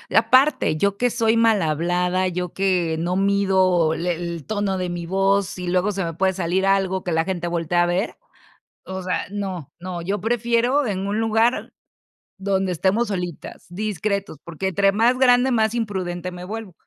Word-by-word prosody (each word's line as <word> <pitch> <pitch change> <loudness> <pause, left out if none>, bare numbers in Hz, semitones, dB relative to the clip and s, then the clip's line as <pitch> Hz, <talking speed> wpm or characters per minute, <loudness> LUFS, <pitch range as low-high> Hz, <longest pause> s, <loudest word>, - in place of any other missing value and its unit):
Aparte, 260 - +4
yo 200 +3 +1
que 245 0 +2
soy 225 -1 +1
malhablada, 180 -3 +1
yo, 180 0 -4
que 180 -4 +1
no 175 +3 -1
mido, 190 -4 +2
le 175 +2 -1
el 170 -2 -5
tono 205 -3 -1
de 180 -1 -2
mi 175 -1 -4
voz, 195 +1 +1
y 180 - -5
luego 185 +3 +1
se 195 -3 -2
me 165 - -4
puede 190 +3 +1
salir 185 +1 -1
algo 190 -1 +1
que 175 - -3
la 160 0 +1
gente 175 -2 -3
voltea 175 +1 +1
a - - +2
ver, 180 +4 -1 0.7
o 190 0 -6
sea, 180 -2 -2
no, 190 -7 -5
no. 175 -1 -6
Yo 200 +4 -2
prefiero 240 +4 +1
en 195 -2 -2
un 210 +2 -1
lugar 225 +2 +1 0.7
donde 190 -1 0
estemos 195 +7 +1
solitas, 180 -4 -5
discretos, 200 -2 -3
porque 170 +3 -4
entre 195 +1 +2
más 235 +4 +3
grande, 250 0 +4
más 220 0 +1
imprudente 185 -5 -3
me 180 0 -8
vuelvo. 215 -2 -7
190 Hz, 175 wpm, -22 LUFS, 175-210 Hz, 0.7 s, Aparte